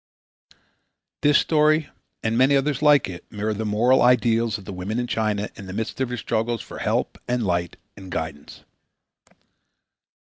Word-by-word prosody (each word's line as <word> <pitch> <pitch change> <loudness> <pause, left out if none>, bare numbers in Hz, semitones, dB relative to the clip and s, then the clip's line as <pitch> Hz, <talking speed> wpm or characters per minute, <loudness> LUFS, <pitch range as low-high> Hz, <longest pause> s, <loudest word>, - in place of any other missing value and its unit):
This 145 0 +5
story 155 -1 +2 0.3
and 110 0 0
many 130 +4 +4
others 140 0 0
like 150 -2 +5
it 90 -2 -8
mirror 105 +1 -2
the 110 +1 -4
moral 120 +5 +3
ideals 115 -2 +3
of 100 - -13
the 100 - -7
women 95 +5 -4
of 120 - -2
China 105 -3 -1
in 100 - -10
the 90 - -7
midst 110 +5 -4
of 130 - 0
their 125 - -4
struggles 115 0 -2
for - - -10
help - - -1
and 125 -2 0
light 85 -2 -1 0.2
and 95 -1 -11
guidance. 80 -4 -6
115 Hz, 165 wpm, -23 LUFS, 100-125 Hz, 0.3 s, This